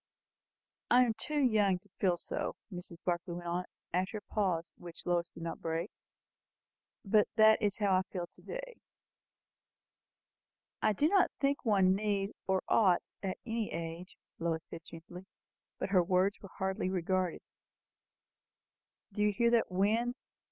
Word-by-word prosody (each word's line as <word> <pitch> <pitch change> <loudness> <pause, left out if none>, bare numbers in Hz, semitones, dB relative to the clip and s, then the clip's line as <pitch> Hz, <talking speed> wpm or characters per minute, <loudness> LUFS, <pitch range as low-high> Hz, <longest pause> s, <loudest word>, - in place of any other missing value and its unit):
I 250 +1 +7
am 230 - 0
too 295 +7 -3
young 215 -8 +3
to 205 +3 -22
feel 180 -3 +3
so," - - -3 0.2
Mrs. 175 -1 -8
Barclay 175 0 -1
went 175 0 -6
on, 175 +1 -1 0.3
after 185 +4 0
a 205 - -13
pause 180 -6 0
which 170 -1 -11
Lois 175 -1 +1
did 165 - -10
not 165 - -5
break; 165 +4 -2 1.1
"but 210 +1 +4
that 220 -1 +6
is 205 -2 +1
how 200 -3 +3
I 185 - +4
feel 180 -3 -3
to - - -22
day." - - -7 2.0
"I 215 - +3
do 290 +9 +3
not 390 +2 +4
think 280 0 +1
one 195 -5 +4
need 200 0 0 0.2
or 190 -1 +1
ought 190 -6 +4 0.2
at 190 -2 -3
any 225 -2 -2
age," 165 +2 -6 0.2
Lois 165 -1 -1
said 165 - -9
gently; 175 +3 -11 0.5
but - - -3
her 185 -2 +5
words 185 +3 +1
were 195 - -10
hardly 190 -1 -1
regarded. 185 -1 0 1.7
"Do 210 - -2
you 210 0 +4
hear 235 +4 +2
that 235 -1 +3
wind?" 220 +6 +1
190 Hz, 150 wpm, -33 LUFS, 175-215 Hz, 2.0 s, I